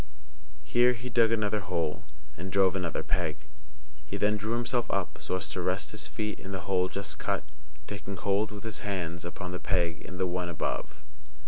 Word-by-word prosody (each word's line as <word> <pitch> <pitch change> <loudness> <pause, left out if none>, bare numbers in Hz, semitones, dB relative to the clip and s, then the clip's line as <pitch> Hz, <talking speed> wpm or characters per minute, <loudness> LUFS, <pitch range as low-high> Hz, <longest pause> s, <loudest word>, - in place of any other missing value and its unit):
Here 120 +10 +5
he 125 +1 -6
dug 115 -1 +5
another 110 -2 +2
hole, 85 -5 -1 0.3
and 95 +4 -5
drove 95 -1 +5
another 90 -4 0
peg. 75 -1 0 0.7
He 85 +7 -4
then 105 +1 +4
drew 110 +2 -1
himself 120 0 +1
up, 95 -2 0
so - - -1
as 95 - -1
to - - -2
rest - - 0
his - - -3
feet 105 0 -2
in 95 - -7
the 95 -2 -2
hole 90 +1 +2
just 100 0 -4
cut, - - 0 0.4
taking 100 +1 -5
hold 100 +3 +2
with 105 -1 -7
his 110 -3 -3
hands 85 -4 -2
upon 90 +1 -4
the 90 - -3
peg 85 -4 +1
in 90 - -7
the 95 - +2
one 90 0 -1
above. 85 - -2
95 Hz, 195 wpm, -30 LUFS, 90-105 Hz, 0.7 s, Here